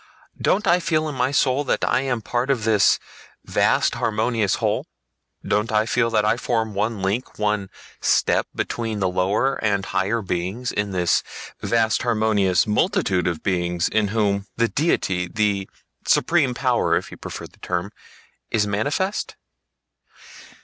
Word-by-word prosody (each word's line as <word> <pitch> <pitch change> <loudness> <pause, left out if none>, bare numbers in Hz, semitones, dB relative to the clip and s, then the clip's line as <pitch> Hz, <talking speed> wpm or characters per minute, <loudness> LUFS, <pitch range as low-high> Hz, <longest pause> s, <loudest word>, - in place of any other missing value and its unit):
Don't 210 +3 +2
I 180 -1 +4
feel 155 -3 0
in 150 - -4
my 125 0 +1
soul 135 0 +2
that - - 0
I - - +2
am 125 -4 -2
part 120 +4 -1
of 130 -5 +1
this 105 -3 +4 0.5
vast - - +2
harmonious 110 -1 0
whole? - - -1 0.6
Don't 105 +3 +1
I 110 0 +2
feel 115 0 +1
that 110 -2 +1
I 110 +2 +2
form 115 -3 -1
one 105 0 -2
link, 100 +7 -2
one 105 -2 -1 0.3
step, - - +2
between 115 -2 -2
the 95 -2 +1
lower 100 +10 0
and 100 -2 +1
higher 105 +4 -1
beings, 95 +7 -3
in 105 0 -1
this 90 -2 +2 0.4
vast 110 -2 +1
harmonious 110 -6 +2
multitude 105 - +1
of 85 -3 -2
beings 90 -2 0
in 110 0 +1
whom 100 -1 0
the 115 0 +3
Deity—the 100 - 0 0.4
Supreme 150 -7 +3
Power - - +2
if - - -3
you - - -9
prefer - - -7
the - - -17
term—is 100 +3 -4
manifest? 145 - -1
110 Hz, 145 wpm, -22 LUFS, 100-125 Hz, 0.6 s, I